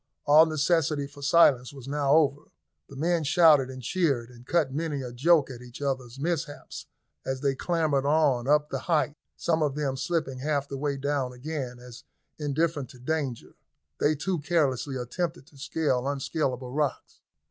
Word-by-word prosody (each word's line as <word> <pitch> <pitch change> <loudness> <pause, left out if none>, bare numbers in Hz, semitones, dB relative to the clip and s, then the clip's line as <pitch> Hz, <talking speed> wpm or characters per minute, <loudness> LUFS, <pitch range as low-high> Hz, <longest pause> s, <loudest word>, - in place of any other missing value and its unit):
All 155 +3 +7
necessity 155 -1 +1
for 140 +1 -13
silence 140 -4 +4
was 135 -3 -11
now 140 0 +1
over, 145 -2 +3 0.4
the 140 - -11
men 165 +3 +1
shouted 155 -4 +5
and 130 -1 -8
cheered 140 -8 0
and 120 +1 -16
cut 155 -6 +1
many 150 -2 -2
a 125 -1 -7
joke 145 +2 +3
at 125 -1 -9
each 125 0 -11
other's 130 -3 -3
mishaps 145 -2 -4 0.4
as 130 0 -3
they 140 -2 +1
clambered 155 -2 0
on 145 -5 +2
up 150 +1 +3
the 135 - -2
height, 150 -1 0 0.2
some 165 -1 0
of 145 -3 0
them 145 -3 -1
slipping 150 -3 -2
half 145 0 -1
the 140 - -6
way 140 0 -2
down 135 -2 -1
again, 130 -1 -5
as, 125 -1 -12 0.4
indifferent 150 -2 -1
to 125 - -14
danger, 135 -2 -3 0.5
they 155 +1 +3
too 175 +4 -2
carelessly 145 -4 0
attempted 155 +6 -3
to 145 - -20
scale 135 -3 -1
unscalable 135 -2 -2
rocks. 145 0 -2
145 Hz, 170 wpm, -27 LUFS, 130-155 Hz, 0.5 s, All